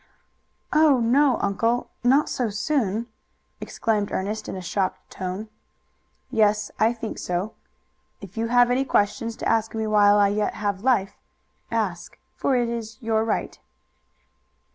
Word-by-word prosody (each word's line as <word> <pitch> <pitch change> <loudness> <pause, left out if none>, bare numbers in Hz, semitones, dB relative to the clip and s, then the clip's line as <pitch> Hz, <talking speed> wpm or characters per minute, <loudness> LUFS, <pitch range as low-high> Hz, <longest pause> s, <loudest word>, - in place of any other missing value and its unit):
"Oh, 300 -4 +5
no, 260 +4 +3
uncle, 230 +5 0
not 270 +5 +4
so 245 -3 -1
soon!" 220 -1 -1 0.5
exclaimed 210 -3 -1
Ernest 215 +3 -3
in - - -5
a - - -5
shocked 185 +1 -3
tone. 185 +3 -5 0.8
"Yes, 210 -3 +2
I 220 +1 +4
think 230 -2 -6
so. 180 +5 -2 0.7
If 200 -1 -12
you 225 0 -1
have 245 +1 +4
any 255 +2 +2
questions 225 -1 0
to - - -4
ask 225 0 +1
me 220 0 -1
while 205 -1 +5
I 200 -1 +4
yet 210 +1 -1
have 200 -2 -2
life, 225 -6 +1 0.5
ask, - - -3 0.2
for 270 - +1
it 240 -1 +1
is 225 -2 -5
your 220 -1 0
right." 225 - -2
220 Hz, 140 wpm, -24 LUFS, 205-240 Hz, 0.8 s, Oh